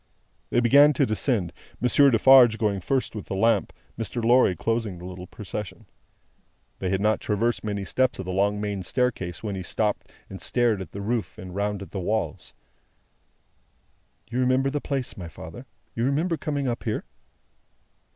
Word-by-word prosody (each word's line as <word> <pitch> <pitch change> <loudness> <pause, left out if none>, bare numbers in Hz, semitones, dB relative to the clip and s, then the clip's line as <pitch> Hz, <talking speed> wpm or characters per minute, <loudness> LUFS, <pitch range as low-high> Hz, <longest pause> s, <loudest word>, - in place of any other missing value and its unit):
They - - +2
began 140 +5 +6
to 140 +1 +2
descend; 110 - 0 0.3
Monsieur 140 +3 +5
Defarge 120 -1 +7
going 105 -3 0
first 130 +3 -1
with 105 - -6
the - - -3
lamp, 115 +4 +2 0.3
Mr. 115 +1 -3
Lorry 120 -5 +5
closing 115 +2 -2
the 90 - -10
little 90 0 -8
procession. 105 0 -7 0.9
They 95 - -2
had 95 +1 0
not 110 +1 +2
traversed 115 +3 0
many 100 -2 -3
steps 130 +6 +1
of 95 - -5
the 90 - -4
long 100 +2 +1
main 105 -2 -3
staircase 95 -5 -2
when 105 -2 -3
he 95 - -4
stopped, 105 +3 -2 0.2
and 95 - -9
stared 120 -5 +1
at 85 -4 -8
the 100 - -6
roof 115 +2 -2
and 90 -1 -9
round 100 0 -2
at - - -13
the 100 - -4
walls. 95 -4 -3 1.8
"You 125 - -1
remember 130 +2 +2
the 145 0 -2
place, 135 -3 -3
my 90 -3 -6
father? 80 - -10 0.3
You 115 - -2
remember 160 +6 +1
coming 145 -3 -2
up 120 -1 -2
here?" 110 -2 -2
110 Hz, 170 wpm, -25 LUFS, 95-125 Hz, 1.8 s, Defarge